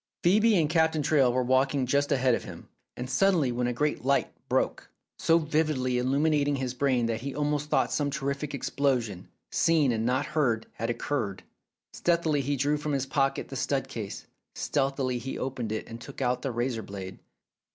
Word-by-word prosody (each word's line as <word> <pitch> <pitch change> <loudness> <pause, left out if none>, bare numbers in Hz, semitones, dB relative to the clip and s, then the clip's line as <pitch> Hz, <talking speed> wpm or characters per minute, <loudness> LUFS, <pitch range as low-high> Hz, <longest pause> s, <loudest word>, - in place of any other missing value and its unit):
Phcebe 210 +3 +5
and 155 - +2
Captain 160 -1 +2
Traill 135 -4 +4
were 130 +1 +1
walking 130 +2 +2
just 140 +3 +1
ahead 130 -2 +3
of - - -1
him, - - -10 0.3
when 125 - -4
suddenly 165 -3 +2
a 125 0 0
great 150 +3 -1
light 140 +1 +1 0.2
broke, - - 0 0.3
so 165 - +4
vividly 150 -5 0
illuminating 145 +2 +2
his 130 -2 -2
brain 125 -2 +1
that 115 -1 -2
he 135 0 -5
almost 150 0 -1
thought - - +2
some 145 -1 0
terrific 140 0 -3
explosion, 125 -9 -1 0.2
seen 155 -5 +3
and 110 -1 -1
not 130 +4 +1
heard, 120 -8 0
had 115 - -3
occurred. 120 -4 -2 0.5
Stealthily 165 -4 +1
he 140 +2 -1
drew 145 +3 +1
from 150 0 -3
his 135 -1 0
pocket 135 0 0
the - - -6
stud - - -1
case, - - -6 0.3
stealthily 135 -3 0
he 135 +2 -5
opened 125 -4 -3
it 110 - -3
and 115 0 -9
took 140 - -10
out 125 -2 0
the 135 - -2
razor 120 -1 -2
blade. 95 -3 -8
135 Hz, 180 wpm, -28 LUFS, 125-150 Hz, 0.5 s, Phcebe